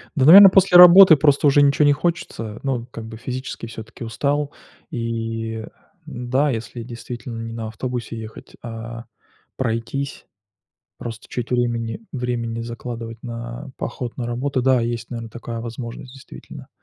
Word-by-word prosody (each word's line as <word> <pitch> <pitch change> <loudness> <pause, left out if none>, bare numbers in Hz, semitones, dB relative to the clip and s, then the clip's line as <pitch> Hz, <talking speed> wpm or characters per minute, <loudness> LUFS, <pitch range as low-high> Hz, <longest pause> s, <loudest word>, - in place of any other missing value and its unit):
Да, 135 -4 +2
наверно, 195 +5 +11
после 185 -1 +5
работы 180 0 +10
просто 145 0 +3
уже 145 +1 +5
ничего 140 +1 +4
не 145 - +5
хочется, 140 -10 -3
ну, 130 -4 -2
как 115 -1 -8
бы, 110 0 -9
физически 130 0 -6
всё-таки 115 +1 -10
устал. 140 +6 -1 0.4
И, 115 -1 -4
э, - - -13 0.4
н-да, 125 +4 -1
если 115 0 -5
действительно 120 0 -7
не 115 0 -6
на 115 -1 -5
автобусе 115 0 -5
ехать, 110 0 -11
а 115 0 -8 0.5
пройтись, 130 +3 -3 0.7
просто 115 -2 -8
чуть 125 -1 -5
времени 120 - -1
времени 120 -3 -3
закладывать 115 -1 -7
на 120 +1 -7
поход 120 -2 -5
на 120 - -4
работу. 130 +2 -2
Да, 130 -2 +3
есть, 115 0 -3
наверное, 115 -2 -6
такая 115 0 -6
возможность 120 +2 -7
действительно. 135 - -12
120 Hz, 145 wpm, -21 LUFS, 115-135 Hz, 0.7 s, наверно